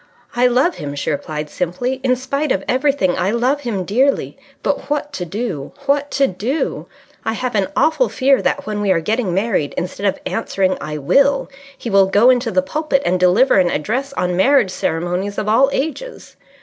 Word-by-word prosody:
"I 245 +1 +4
love 260 +8 +2
him!" 145 -1 -5
she 145 - -2
replied 150 +1 -4
simply. 180 - -3
"In 255 -1 +3
spite 275 +3 -2
of 195 - 0
everything, 260 -8 +1
I 185 - +1
love 245 +6 +1
him 210 -8 -3
dearly. 260 +8 +1 0.3
But 270 - -2
what 295 0 -2
to 180 - -4
do? 180 - -4
What 285 +1 +1
to 275 - +4
do? 235 - -3 0.4
I 225 - -1
have 250 +2 -3
an 200 -3 +1
awful 320 +11 +2
fear 270 0 +2
that 285 - -1
when 210 -1 -3
we 205 - 0
are 175 - +3
getting 215 +4 -1
married 190 -5 -1
instead 185 +3 -2
of 195 - -1
answering 190 -4 0
'I 150 0 -4
will,' 275 - +2 0.3
he 235 - -5
will 195 -1 +5
go 210 +6 +5
into 245 -1 +1
the 275 +5 +1
pulpit 290 -1 -1
and 185 +1 +1
deliver 190 +6 +4
an 180 -2 +3
address 255 - -2
on 180 -4 -1
Marriage 240 +1 +3
Ceremonies 180 +4 -2
of 210 - -2
All 255 +6 +4
Ages. 320 - -4
225 Hz, 190 wpm, -18 LUFS, 185-275 Hz, 0.4 s, will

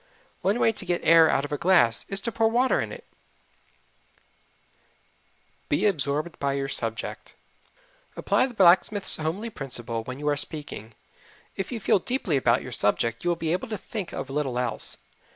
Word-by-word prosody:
One 200 +4 +1
way 225 - +3
to 210 - -8
get 175 -2 -2
air 165 0 +6
out 140 - +1
of 145 - -9
a 145 - -3
glass 145 -11 +3
is 195 - 0
to 230 - -3
pour 225 0 +1
in 225 - -2
water. 255 +2 0 2.7
Be - - +1
Absorbed 155 -3 -1
by 140 -1 -1
Your 135 0 -2
Subject 115 -3 -3 0.8
Apply - - +1
the 245 - -12
blacksmith's 190 +2 +6
homely 180 +9 -4
principle 120 - -5
when 130 +3 -7
you 150 +1 -5
are 145 - +1
speaking. 145 -8 -6 0.6
If 195 +4 -5
you 235 - -4
feel 200 - +2
deeply 220 - -2
about 125 -2 +2
your 130 - -8
subject 115 +1 0
you 175 - 0
will 175 - +1
be 165 -1 -2
able 185 +9 -3
to 215 -2 -4
think 200 -1 -6
of 135 - -6
little 135 -3 -2
else. 125 -2 -3
160 Hz, 170 wpm, -25 LUFS, 135-200 Hz, 2.7 s, air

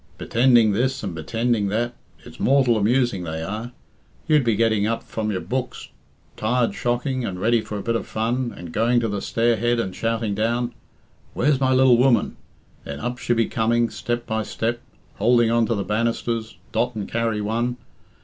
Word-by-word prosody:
Bittending 120 -3 +4
this 130 +4 0
and 95 -5 -4
bittending 115 +4 0
that 120 +4 -1 0.3
it's - - -13
mortal 130 -3 +3
amusing 115 -1 +1
they 80 -1 -4
are. 110 +7 -5 0.6
You'd 150 -3 +4
be 115 -3 +2
getting 110 -1 +2
up 115 +1 -2
from 110 -1 -3
your 95 -3 -2
books, 130 +3 -4 0.5
tired 120 +2 +1
shocking, 125 +2 -1
and 95 -5 -4
ready 115 +3 +2
for 105 - -6
a 100 - -5
bit 115 +2 0
of - - -3
fun, 120 +3 -1
and 85 -2 -8
going 120 +5 +2
to 115 - 0
the 100 -2 -3
stair 115 +2 +1
head 120 +2 +1
and 95 -5 -3
shouting 115 -2 -1
down, 120 +3 -1 0.6
'Where's 140 +1 +2
my 130 -1 +2
lil 130 -2 +5
woman?' 125 -1 +3 0.5
Then 70 0 -6
up 120 +9 -4
she'd 120 - 0
be 115 - +3
coming, 115 +1 +1
step 120 0 -3
by 110 0 -1
step, 115 +2 -2 0.4
houlding 120 +1 +4
on 115 -1 +3
to 115 - 0
the 100 - -2
bannisters, 115 +2 -2
dot 125 -1 0
and 105 -3 -4
carry 115 -2 -1
one. 115 +4 -1
115 Hz, 185 wpm, -23 LUFS, 110-120 Hz, 0.6 s, lil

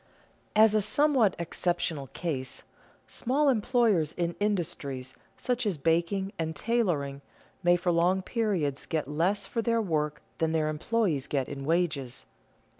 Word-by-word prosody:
_ - - -34 0.5
As 215 0 +6
a 215 - +3
somewhat 240 +1 +3
exceptional 170 -4 -2
case, 135 -4 -4 0.4
small 280 +4 +1
employers 220 - +2
in 170 -1 -1
industries 145 -10 -2 0.2
such 250 0 -1
as 190 -6 0
baking 170 +6 0
and 160 -1 -2
tailoring, 165 -13 0 0.4
may 175 -1 +5
for 175 0 0
long 180 +3 +2
periods 185 - -1
get 155 -4 -1
less 180 +7 0
for 230 - -2
their 230 0 +1
work 150 -7 -1 0.2
than 160 0 +1
their 155 -1 +1
employees 155 - 0
get 135 -3 -1
in 140 -1 -6
wages. 155 - -1
175 Hz, 140 wpm, -28 LUFS, 150-215 Hz, 0.5 s, As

